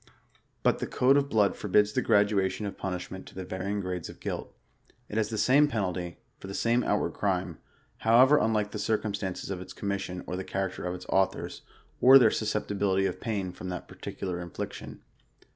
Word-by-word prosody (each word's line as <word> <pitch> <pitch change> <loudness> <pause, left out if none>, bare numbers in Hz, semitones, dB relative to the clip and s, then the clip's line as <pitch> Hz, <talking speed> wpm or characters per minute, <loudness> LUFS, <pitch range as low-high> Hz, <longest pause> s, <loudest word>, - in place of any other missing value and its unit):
But - - +3
the - - -3
code 130 +2 +3
of 140 0 +2
blood 105 -4 +3
forbids 105 +1 +2
the - - +1
graduatif)n 100 0 +2
of 100 - -4
punishment 95 0 -5
to - - -14
the 95 0 -5
varying 95 +3 -3
grades 90 -3 -4
of - - -11
guilt. - - -4 0.6
It 105 - -5
has 110 -1 +1
the 110 - -3
same 140 +6 +5
penalty, 90 - -3 0.2
for - - -9
the 100 - -6
same 120 +1 +2
out 105 - +2
ward - - -2
crime, 90 -4 -1 0.4
however 130 +6 +6
unlike 105 -2 +1
the 105 - -5
circumstances 100 -3 -2
of 90 -2 -4
its 95 - -10
commis 100 -1 -2
sion, 90 -1 -6
or 90 - -4
the 95 - -3
character 95 -1 -3
of 90 0 -2
its 90 - -9
authors, 95 0 0 0.4
or 130 +2 +10
their 115 -5 +6
susceptibility 100 -3 0
of - - -3
pain 100 -5 -2
from 90 +1 -7
that 90 -1 -5
particular 90 -2 -5
infliction. 85 -2 -7
100 Hz, 195 wpm, -28 LUFS, 95-110 Hz, 0.6 s, or